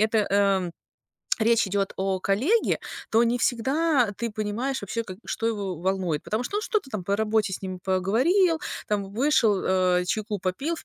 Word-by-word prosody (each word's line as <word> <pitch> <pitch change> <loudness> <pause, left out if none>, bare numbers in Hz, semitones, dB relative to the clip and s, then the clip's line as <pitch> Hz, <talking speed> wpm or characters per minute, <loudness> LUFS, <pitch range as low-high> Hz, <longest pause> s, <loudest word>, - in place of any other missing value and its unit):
эта, 220 +1 +3
эм, 195 -3 +2 0.7
речь 230 0 +3
идёт 195 -1 0
о 190 -1 -1
коллеге, 260 - +2 0.3
то 230 +2 +4
не 235 +1 +1
всегда 265 +3 +2
ты 235 -1 -2
понимаешь 215 +5 -2
вообще, 230 +4 -3
как 185 -3 -8
и 210 - -26
что 225 - -2
его 200 -5 -2
волнует. 180 -3 -1
Потому 220 +3 -2
что 405 - -3
он - - -1
что-то 420 - -1
там 210 -4 -3
по 200 +3 0
работе 215 -2 +1
с - - -8
ним 185 -1 -5
поговорил, 260 - +2 0.3
там, 205 -2 -1
вышел, 225 -4 +3
а, 185 -1 +2
чайку 210 +2 -2
попил 190 - -2
в - - -11
215 Hz, 185 wpm, -25 LUFS, 190-245 Hz, 0.7 s, то